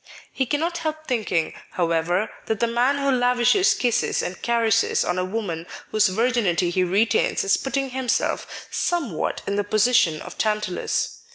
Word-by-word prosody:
He 265 -2 -1
cannot 330 +5 -1
help 310 -1 -4
thinking, 205 - -1 0.2
however, 175 +3 0 0.2
that 220 -2 -1
the 235 - +3
man 245 +4 +1
who 275 -1 +1
lavishes 250 +8 +3
kisses 240 -2 0
and 180 - -5
caresses 230 -2 +2
on 180 +1 -1
a - - 0
woman 185 -4 -4 0.2
whose 215 -1 +4
virginity 195 -4 +1
he 185 +1 +1
retains 210 +5 +1
is 195 - +3
putting 270 -1 -2
himself 255 -2 -2
somewhat 290 - -2
in 200 - -2
the 205 - +1
position 215 -6 +3
of - - -11
Tantalus. 210 -4 -1
225 Hz, 155 wpm, -23 LUFS, 185-250 Hz, 0.2 s, whose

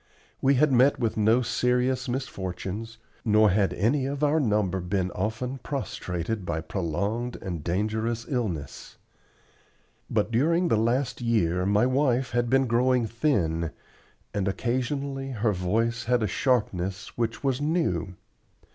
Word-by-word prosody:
We 135 +1 +4
had 145 +2 +4
met 130 +3 +5
with 115 -3 -1
no 110 +4 +3
serious 125 +2 +1
misfortunes, 110 -3 -4 0.3
nor 105 -2 +4
had 100 0 +2
any 130 +7 +1
of 140 +1 -3
our 150 +2 +3
number 105 - +1
been 90 0 -1
often 110 +8 -3
prostrated 105 - -3
by 80 -2 -2
prolonged 100 +8 -2
and 85 -5 -5
dangerous 110 +6 -1
illness. 95 - -4 1.1
But - - 0
during 165 +9 +2
the - - +4
last 120 +4 0
year 95 -6 +1
my 105 +3 +3
wife 130 -1 +1
had 120 -1 0
been 135 +1 +4
growing 125 0 +2
thin, 95 - 0 0.6
and 100 -2 -1
occasionally 135 +5 -2
her 110 -2 +1
voice 115 +6 0
had 120 -1 +2
a - - +1
sharpness 100 -4 -1
which 115 0 -2
was 135 0 0
new. 145 - 0
115 Hz, 135 wpm, -26 LUFS, 95-130 Hz, 1.1 s, met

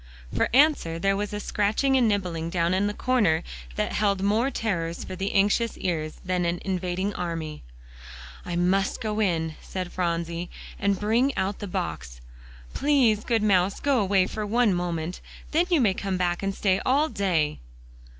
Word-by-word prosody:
For - - +2
answer 270 - +3
there 195 +3 +1
was 205 +1 -2
a 210 - -3
scratching 215 +7 +1
and 250 -3 +4
nibbling 180 -6 -1
down 170 0 +1
in 195 +2 +2
the 205 - -2
corner 210 -11 +2 0.3
that - - -1
held 200 -2 +1
more 220 +6 +2
terrors 170 -10 -2
for - - -6
the 195 +2 -2
anxious 210 +3 +2
ears 155 -4 -2
than 180 -1 0
an 170 0 0
invading 185 +1 -1
army. 165 -4 -4 0.8
"I 175 - -4
must 190 +3 +1
go 215 -3 -2
in," 165 -6 0
said 185 -2 -5
Phronsie, 170 -1 -2 0.3
"and 200 -1 +1
bring 235 +6 +1
out 195 +1 -1
the 205 - -5
box. - - -4 0.5
Please, 255 -7 +3
good 230 -3 +1
mouse, 195 -2 +2
go 280 -3 +2
away 195 -2 +3
for 215 - -4
one 220 0 +2
moment; 175 -1 -3 0.3
then 335 +3 +2
you 345 -4 +4
may 215 -7 +3
come 195 -1 -2
back 175 -1 0
and 195 0 -2
stay 190 -2 +1
all 285 +4 +3
day." 175 - 0
195 Hz, 170 wpm, -26 LUFS, 175-215 Hz, 0.8 s, and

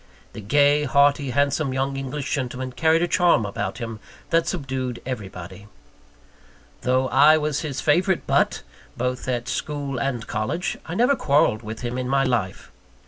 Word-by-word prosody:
The - - -8
gay, 145 +6 +3
hearty, 140 0 +3
handsome 140 +1 0
young 135 +1 -1
English 135 +2 -4
gentleman 130 -2 -3
carried 160 +5 +2
a - - +1
charm 170 - +3
about 100 +2 -4
him 115 -3 -6 0.3
that 165 0 +2
subdued 130 -7 -3
everybody. 100 -5 -7 1.1
Though 130 +1 +1
I 150 +4 +6
was 150 -2 -1
his 145 -5 -4
favourite 175 +4 +2
butt, - - +1 0.3
both 125 +1 -2
at 120 -1 -2
school 140 -3 -3
and 125 -3 -2
college, 140 - -2
I 170 - -4
never 250 +7 +3
quarrelled 140 - +2
with 110 0 -7
him 125 +1 -3
in 125 0 -3
my 135 0 +3
life. 115 -8 -2
135 Hz, 155 wpm, -23 LUFS, 125-150 Hz, 1.1 s, I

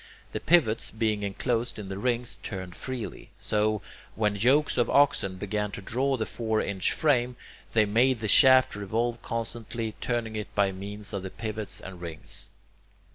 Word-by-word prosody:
The - - -3
pivots, 150 -10 +3
being 110 -2 0
enclosed 115 +4 -1
in 105 -2 -6
the 95 0 -5
rings, 120 0 -1
turned 95 -3 -6
freely. 130 -4 -6
So, 105 -1 0 0.3
when 105 -2 +1
yokes 130 +8 +3
of 120 - +2
oxen 135 -9 +3
began 105 +2 -2
to 100 - -5
draw 135 +6 0
the 110 - -1
four 110 -1 -1
inch 100 -3 0
frame, 125 -5 +2 0.4
they 110 -2 +5
made 120 +4 +3
the 110 - -2
shaft 130 +1 +7
revolve 115 +4 -2
constantly, 115 -1 -4
turning 115 -2 -2
it 105 -1 -6
by 100 -1 +3
means 100 +2 -7
of 100 - -2
the 95 - -5
pivots 105 -2 -5
and 90 -3 -10
rings. 80 -3 -4
110 Hz, 165 wpm, -27 LUFS, 100-120 Hz, 0.4 s, shaft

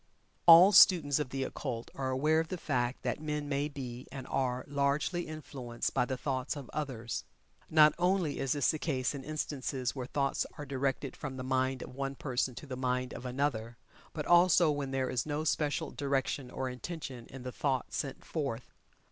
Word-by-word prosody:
All 170 +4 +10
students 160 -8 +7
of 145 -4 -2
the 135 0 -2
Occult 125 -3 -5
are 130 -1 -3
aware 150 +5 +2
of 160 - -1
the 185 - -4
fact 125 -5 -1
that - - -2
men 150 -1 -3
may 145 0 0
be, 130 -4 -7
and 135 -1 -7
are, 130 -2 -1
largely 145 +5 0
influenced 135 -6 -5
by - - +2
the 130 0 -3
thoughts 130 -1 -2
of 140 -4 -8
others. 125 -6 -3 0.5
Not 155 -1 +7
only 180 -4 +1
is 135 -2 +1
this 145 -3 +2
the 155 - -4
case 130 -5 -1
in 140 -2 -6
instances 140 -4 -3
where 125 -2 -4
thoughts 140 0 0
are 145 - -6
directed 135 0 -2
from 135 -2 -6
the 130 - -4
mind 130 0 0
of - - -10
one 135 +1 -3
person 130 -2 -1
to - - -8
the 135 -2 -5
mind 125 0 -1
of 125 - -6
another, 125 -3 -2 0.3
but 150 -2 -4
also 175 -2 +6
when 145 -2 -2
there 135 -1 0
is 125 +2 -1
no 150 +1 -1
special 150 0 0
direction 135 -2 -1
or 130 +1 -3
intention 130 -2 -6
in 135 -1 -10
the 125 - -5
thought 130 -1 -1
sent 135 -2 -4
forth. 135 -7 -4
135 Hz, 190 wpm, -32 LUFS, 130-150 Hz, 0.5 s, All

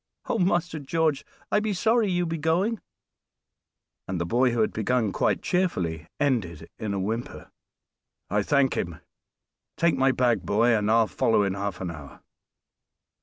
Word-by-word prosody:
Oh! 230 - -1
Master 175 -3 +1
George, 155 0 0 0.3
I - - +4
be 215 -1 -1
sorry 225 +2 +2
you 175 -1 +1
be 165 -1 -3
going," 180 +8 0 1.3
and 95 -2 -3
the 85 - -1
boy, 125 +8 +2
who 120 -1 0
had 110 - +1
begun 110 0 0
quite - - 0
cheerfully, 90 - -1
ended 115 - -1
in 105 -2 -3
a - - -1
whimper. 110 +5 -4 0.8
"I 105 +2 +1
thank 140 +4 +2
him! 85 -3 -3 0.8
Take 170 -1 +3
my 135 0 +3
bag, 120 -5 +2
boy, 115 +6 +3
and 105 -1 0
I'll 115 0 +5
follow 110 0 +2
in 100 -1 0
half 100 -1 -4
an 90 -2 -3
hour." 75 -4 -11
120 Hz, 160 wpm, -26 LUFS, 100-165 Hz, 1.3 s, I'll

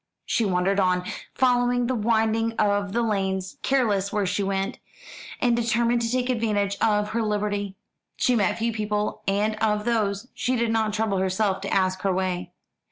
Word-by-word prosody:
She 230 - +1
wandered 190 +1 +1
on, 180 -1 +2 0.3
following 245 -1 +2
the 255 - 0
winding 225 0 +1
of 205 -2 +1
the 235 +3 0
lanes, 190 -3 -1
careless 210 -8 +1
where 210 -2 0
she 200 +2 -1
went, 195 0 -2 0.6
and 240 -1 +3
determined 235 +1 +1
to 230 - -1
take 250 +1 0
advantage 210 -5 0
of 210 -1 +2
her 230 +2 -1
liberty. 205 -2 -1 0.4
She 250 - +2
met 205 -5 +1
few 230 0 -1
people, 210 -1 -2
and 210 +2 +1
of 210 -1 0
those 220 -1 0
she 255 - -1
did 235 -1 0
not 220 -1 +1
trouble 215 -3 0
herself 190 +1 0
to 195 - -4
ask 185 -1 +1
her 195 - +1
way. 180 -1 -2
210 Hz, 170 wpm, -25 LUFS, 195-230 Hz, 0.6 s, and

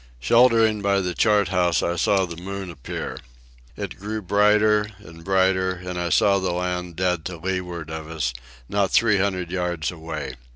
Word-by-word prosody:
Sheltering 115 - +4
by 100 0 +2
the 90 -2 -2
chart 105 -1 +3
house, 90 -2 +2
I 85 - 0
saw 95 +2 +2
the 85 -2 -8
moon 95 +1 -6
appear. 70 -6 -6 0.6
It - - -6
grew 105 +3 -4
brighter 105 +2 +3
and 85 -5 -14
brighter, 95 0 +2
and 90 0 -6
I 85 - -1
saw 100 +3 +4
the 95 -2 -1
land, 90 -1 -3
dead 90 -2 0
to 90 -2 -5
leeward 90 -2 -4
of 80 -1 -6
us, 75 -7 -2 0.3
not 100 +3 +1
three 105 -3 +3
hundred 95 -3 -1
yards 90 -4 -2
away. 80 -5 -6
90 Hz, 170 wpm, -23 LUFS, 85-100 Hz, 0.6 s, Sheltering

